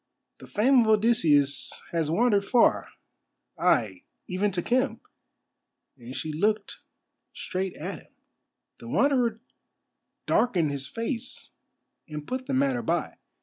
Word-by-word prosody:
The - - -12
fame 250 +5 +3
of 225 - +1
Odysseus 210 - +3
has 165 -3 -1
wandered 205 +3 +2
far—ay, 235 +3 0 0.2
even 190 +3 0
to 180 -3 -3
Khem." 255 +3 0 1.0
And 125 0 -10
she 155 -1 -4
looked 210 +6 -1 0.5
straight 185 0 -4
at - - -6
him. - - -22 0.7
The 115 - -11
Wanderer 245 - +2 0.9
darkened 175 -11 +2
his 140 -1 -4
face 230 +1 -5 0.6
and 150 -1 -6
put 255 - -4
the 275 - -2
matter 265 -2 +1
by. 170 -7 -2
210 Hz, 115 wpm, -26 LUFS, 160-245 Hz, 1.0 s, fame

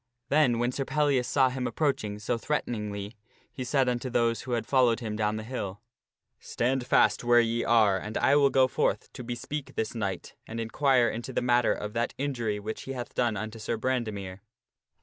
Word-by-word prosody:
Then, 140 -5 +4
when 120 +1 +1
Sir 135 - -2
Pellias 140 -3 +1
saw 135 -2 +3
him 130 0 -3
approaching 120 -9 -1
so 105 +3 -1
threateningly, 105 -6 -3 0.4
he 130 - -5
said 130 +1 +1
unto 125 +1 -1
those 115 -1 +1
who 125 - -4
had 115 -2 -1
followed 125 -3 +3
him 110 -3 -4
down 105 0 0
the 110 - -4
hill: 105 -5 -5 0.3
" - - -56
Stand 125 +1 0
fast - - +3
where 120 0 +5
ye 115 0 +1
are 105 -5 +4
and 105 +2 -5
I 140 - +4
will 140 -1 +5
go 130 -1 +4
forth - - -1
to 125 - -7
bespeak 130 +4 -5
this 110 - -2
knight, 100 -6 -4
and 115 +1 -5
inquire 125 +2 +2
into 120 +4 -4
the - - 0
matter 120 -1 +3
of 105 0 -6
that 120 0 -1
injury 120 -7 -2
which 110 +2 -5
he - - -2
hath 125 -2 -6
done 120 -4 0
unto 110 +2 -5
Sir 115 +2 -2
Brandemere." 110 -6 -3
120 Hz, 200 wpm, -28 LUFS, 110-130 Hz, 0.4 s, where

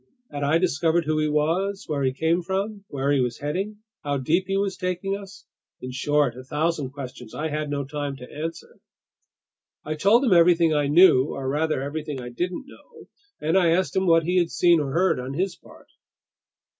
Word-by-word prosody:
Had 145 -1 -5
I 145 +3 +3
discovered 165 -1 +1
who 155 0 0
he 155 - +1
was, 170 +7 0
where 150 -3 -2
he 130 -1 +2
came 160 +6 0
from, 200 +3 -3
where 140 0 -1
he 140 - +3
was 125 -2 -1
heading, 195 +9 -4 0.2
how 145 -1 -1
deep 165 +8 +1
he 195 0 0
was 195 -1 -1
taking 185 +1 -2
us? 200 -1 -11 0.3
In 125 - -7
short, 145 -1 +1
a 130 - -9
thousand 150 0 -1
questions 125 -4 -9
I 160 +1 -2
had 150 0 -3
no 140 -1 -2
time 145 0 -4
to 125 -1 -12
answer. 165 +3 -7 1.1
I 155 - -2
told 205 - +3
him 225 - +4
everything 170 -1 +5
I 145 -1 +1
knew—or, 140 -4 +4
rather, 150 0 0
everything 150 0 -4
I 125 -1 -7
didn't 180 - -4
know—and 405 - -7
I 180 -3 +4
asked 185 +2 0
him 190 0 +1
what 165 -1 +5
he 180 +3 +2
had 170 -1 +1
seen 175 -1 +4
or 140 -3 -2
heard 180 0 +2
on 130 +2 -5
his 185 +3 -1
part. - - -18
160 Hz, 195 wpm, -24 LUFS, 145-185 Hz, 1.1 s, everything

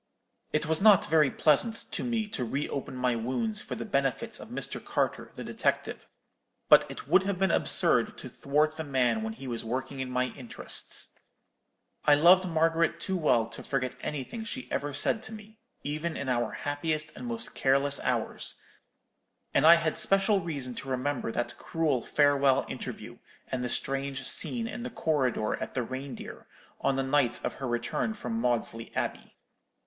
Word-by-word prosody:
"It 155 +1 0
was 160 +2 0
not 205 -3 +7
very 155 -3 +4
pleasant 155 - +3 0.2
to - - -2
me 230 -3 -1
to 130 - -3
re 135 +5 -2
open 135 -2 -5
my 125 -1 +1
wounds 210 - -1
for - - -5
the - - -5
benefit 140 - -1
of - - -9
Mr. - - -5
Carter - - -1
the - - -6
detective; - - -2 0.6
but - - +7
it - - -8
would 180 +5 +5
have 195 0 -2
been 190 -1 +2
absurd - - +3
to - - -8
thwart 150 +2 0
the 160 - -3
man 125 -6 +1
when 110 0 -3
he 135 +4 -10
was 120 -2 -2
working 130 +4 -4
in 130 -1 -3
my 125 0 0
interests. 125 -3 -3 0.9
I 150 - +7
loved 180 +5 +6
Margaret 165 0 +2
too 190 - -2
well 150 -10 +3
to - - -8
forget 130 -2 -2
anything 150 - -4
she 255 +3 -5
ever 145 +1 -1
said 220 - -1
to 220 - -7
me, 215 0 -12 0.2
even 155 +3 -3
in 140 - -3
our 120 -1 0
happiest 155 +1 -2
and 245 - -7
most 230 -1 -5
careless 140 +1 +2
hours: - - -2 1.0
and - - +5
I 170 - +11
had 165 -2 0
special 195 +1 +4
reason 145 -8 -4
to 135 - -9
remember 130 -1 -1
that 120 +1 -3
cruel 155 -6 0
farewell 140 -1 +3
interview, - - -7 0.3
and 125 -1 -1
the 125 - -1
strange 135 +1 -2
scene 235 -2 +1
in 235 - -6
the 245 - -4
corridor 130 -8 0
at - - -6
the 130 - 0
Reindeer, 130 +3 -7 0.3
on 135 - +1
the 135 - 0
night 135 -2 +1
of - - -1
her 135 - -2
return 120 - -1
from 115 - -3
Maudesley 115 -2 -1
Abbey. - - -3
145 Hz, 175 wpm, -29 LUFS, 130-170 Hz, 1.0 s, I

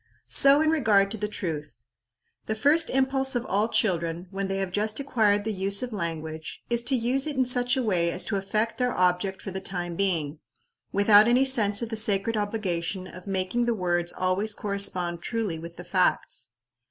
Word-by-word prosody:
So 280 +2 +6
in 315 0 +2
regard 210 -10 +3
to 210 -2 -2
truth. 155 - -6 0.7
The 220 - -1
first 295 +9 +3
impulse 265 0 +1
of 245 0 -1
all 205 +3 0
children, 175 -6 0
when 195 0 -3
they 195 0 -2
have 195 -2 -3
just 215 +4 -1
acquired 215 -7 +1
the 220 0 -2
use 195 +3 0
of 245 -2 -5
language, 160 -4 -6
is 235 0 +2
to 265 - +2
use 255 +4 0
it 300 - -3
in 260 -1 +2
such 245 +1 +2
a 260 - 0
way 175 -6 +1
as 180 - 0
to 210 - -2
effect 215 +5 -2
their 250 -1 0
object 185 +2 0
for 195 - -5
the 190 +1 -5
time 175 -3 -5
being, 165 -6 -1 0.5
without 205 +1 +5
any 250 +3 +4
sense 220 -5 +2
of 230 - -4
the 225 - -4
sacred 215 +1 +2
obligation 195 -4 -3
of 180 +1 -12
making 190 +5 -1
the 235 -1 0
words 175 -3 0
always 195 +4 0
correspond 185 -4 0
truly 215 -8 -3
with 170 +1 -10
the 175 - -8
facts. 175 - 0
200 Hz, 190 wpm, -26 LUFS, 180-230 Hz, 0.7 s, So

